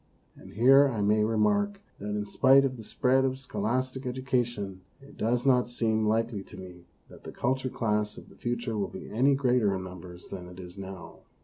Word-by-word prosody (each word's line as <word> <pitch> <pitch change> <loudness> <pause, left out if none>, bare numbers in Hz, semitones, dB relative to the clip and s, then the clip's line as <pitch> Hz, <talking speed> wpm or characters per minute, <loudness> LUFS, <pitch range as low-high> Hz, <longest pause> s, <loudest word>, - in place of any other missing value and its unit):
And - - -14
here 135 +6 +6
I 115 -5 -3
may 105 +1 +3
remark 200 - +1 0.2
that 105 +1 -4
in 105 0 -2
spite 135 +5 +5
of 130 -1 -2
the 115 - -9
spread 130 +4 +2
of 130 0 0
scholastic 130 +2 -2
edu 130 0 -5
cation 115 -7 -1 0.2
it 140 +1 -16
does 120 +3 0
not 125 -2 +4
seem 110 -3 0
likely 110 -1 0
to 100 +2 -12
me 90 -2 -11 0.2
that - - -15
the - - -8
cultured 130 0 -2
class 105 -2 0
of - - -11
the - - -17
future 120 -1 -3
will 100 -2 -1
be - - -9
any 135 +6 +3
greater 125 -7 +2
in 95 - -4
numbers 90 -1 -10
than 90 -2 -7
it 90 +1 -12
is 90 -1 -9
now. 95 -2 -9
115 Hz, 205 wpm, -28 LUFS, 100-130 Hz, 0.2 s, here